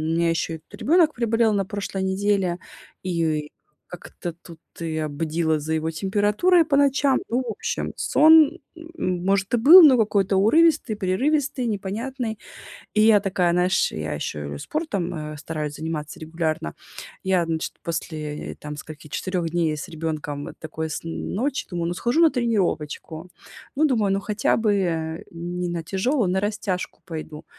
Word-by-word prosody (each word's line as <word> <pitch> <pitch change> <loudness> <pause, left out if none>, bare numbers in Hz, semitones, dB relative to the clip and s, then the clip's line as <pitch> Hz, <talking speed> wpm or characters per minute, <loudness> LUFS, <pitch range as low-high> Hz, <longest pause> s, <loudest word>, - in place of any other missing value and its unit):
меня 170 0 +2
ещё 165 -1 -2
тут - - -12
ребёнок 320 +1 +4
приболел 230 -1 +2
на 195 -1 0
прошлой 200 -1 -4
неделе, 190 -2 0 0.5
и 160 -4 -1 0.4
как-то 175 -1 -8
тут 165 -1 -14 0.2
я 160 -2 -2
бдила 160 +1 -1
за 160 +2 -3
его 160 +1 -1
температурой 210 - +2
по 300 -2 +1
ночам. 280 -1 +3
Ну, 245 +3 +1
в - - -1
общем, 470 +2 -3
сон, 315 +1 +5 0.2
м 325 - -4
может, 195 +2 +1
и - - +4
был, 320 +10 +10
но 275 -5 +7
какой-то 200 -2 +2
урывистый, 290 +2 +4
прерывистый, 260 +7 0
непонятный. 220 +3 -3 0.5
И 215 - +3
я 215 -2 +6
такая, 185 -3 +1
наешь, 180 +1 +2
я 80 0 -4
ещё 75 0 -4
и - - -6
спортом, 200 - -3 0.2
э, 150 - -9
стараюсь 150 -1 -4
заниматься 155 -1 -5
регулярно. 160 - -3 0.5
Я, 185 -3 +2
значит, 160 -1 -3
после, 155 -2 -4
э, - - -17
там 150 0 -8
скольки, 155 0 -10
4 180 +1 -2
дней 165 -2 0
с - - -7
ребёнком 155 -3 -4
такой 160 0 -5
сн 165 +2 -5 0.3
ночи, 270 +7 -1
думаю, 170 -2 -2
ну, - - -2
схожу 240 - +1
на 325 -2 +6
тренировочку. 180 - -2 0.5
Ну, 305 +3 +3
думаю, 220 -9 +2
ну 195 - -1
хотя 210 +1 +1
бы 175 -7 -1
не 175 +1 -4
на 170 -1 -3
тяжёлую, 195 - 0
на 190 - +1
растяжку 200 -2 -3
пойду. 155 -3 -7
185 Hz, 155 wpm, -23 LUFS, 160-230 Hz, 0.5 s, был